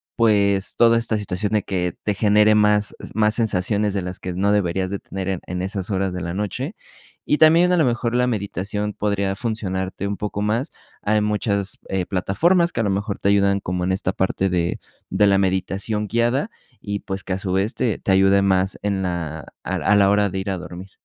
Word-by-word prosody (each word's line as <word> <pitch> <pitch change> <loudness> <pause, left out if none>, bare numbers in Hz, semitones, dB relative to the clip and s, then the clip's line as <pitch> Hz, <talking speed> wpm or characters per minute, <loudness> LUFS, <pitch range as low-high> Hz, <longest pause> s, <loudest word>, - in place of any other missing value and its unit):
pues, 100 -4 +2
toda 115 -1 +5
esta 115 -1 0
situación 105 +1 -3
de 105 - +2
que 90 -3 -2
te 105 - 0
genere 105 +1 +4
más 105 0 +2 0.2
más 105 0 +3
sensaciones 105 -2 +1
de 95 - -1
las 90 0 -6
que 90 - -5
no 100 +3 +1
deberías 95 -2 0
de 100 - -3
tener 95 -1 -6
en 95 -2 -1
en 90 0 -3
esas 95 0 -3
horas 95 -1 0
de 90 - -4
la 85 0 -4
noche. 120 - -3 0.5
Y 150 - +2
también 165 +3 +6
a 180 - +3
lo 160 - +4
mejor 120 -1 -1
la 125 0 +2
meditación 105 -1 -3
podría 100 -2 -1
funcionarte 100 -4 -3
un 100 0 -3
poco 105 -1 -4
más. 110 +6 -1 0.3
Hay 105 0 +1
muchas, 105 -2 -1
eh, 95 -2 -1
plataformas 170 - +1
que - - -1
a - - 0
lo 105 - 0
mejor 100 +1 -2
te 100 - +1
ayudan 100 -1 +3
como 90 -1 -2
en 95 - +1
esta 95 -1 0
parte 95 0 0
de 85 -1 -1 0.3
de 105 - +3
la 100 -1 +4
meditación 95 +3 -1
guiada 120 - 0 0.3
y 100 -1 -3
pues 95 0 -6
que 95 - -3
a 95 - -2
su 95 -1 -3
vez 95 +3 0
te 120 -5 0
te - - -2
ayude 95 +1 +4
más 95 0 +1
en 100 -2 0
la 85 -4 -3 0.2
a - - -2
a 105 - +2
la 100 -1 +5
hora 105 0 +2
de 95 - -5
ir 95 +1 -4
a 95 - -2
dormir. 90 +2 -9
100 Hz, 215 wpm, -22 LUFS, 95-105 Hz, 0.5 s, también